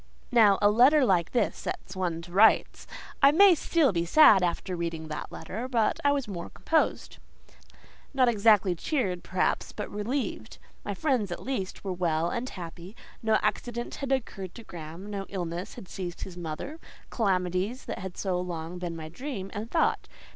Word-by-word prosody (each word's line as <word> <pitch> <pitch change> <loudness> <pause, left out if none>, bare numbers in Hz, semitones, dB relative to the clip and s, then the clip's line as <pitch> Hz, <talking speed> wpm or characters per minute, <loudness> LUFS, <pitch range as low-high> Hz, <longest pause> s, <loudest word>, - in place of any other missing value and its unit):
Now, 215 -5 +6
a 205 - +6
letter 260 +6 +6
like 175 -6 +2
that 235 -4 +2
sets 185 - -6
one 175 -3 -2
to 175 - -12
rights! 205 +5 +4 0.3
I 275 0 +8
might 360 0 +6
still 315 -7 +2
be 170 -3 0
sad 200 - +7
after 180 +1 -1
reading 165 -2 -4
that 155 - -5
letter, 215 +9 -6
but 230 -4 +1
I 285 - +4
was 280 -4 -1
more 175 -4 -6
composed; 320 -1 -1 0.9
not 260 -3 +3
exactly 210 -4 +4
cheered, 185 - -2
perhaps, 185 0 -1
but 210 - -6
relieved. 235 +7 -3 0.3
My - - -4
friends, 260 - 0
at 175 - -5
least, 215 -8 -4
were 195 -2 -2
well 170 -2 0
and 250 +2 -3
happy: 175 +2 -9 0.3
no 220 -1 +3
accident 240 0 -2
had 275 -1 -4
occurred 200 -8 -3
to 230 - -10
Graham; 170 +1 -9
no 195 -1 -4
illness 175 -1 -5
had 190 - -10
seized 180 -2 -6
his 185 - -7
mother—calamities 185 - -3
that - - -5
had 185 -1 -7
so 185 -3 -1
long 175 0 -5
been 175 -2 -4
my 160 -1 -7
dream 195 - -6
and 215 +3 -5
thought. 325 - +1
195 Hz, 170 wpm, -28 LUFS, 175-245 Hz, 0.9 s, I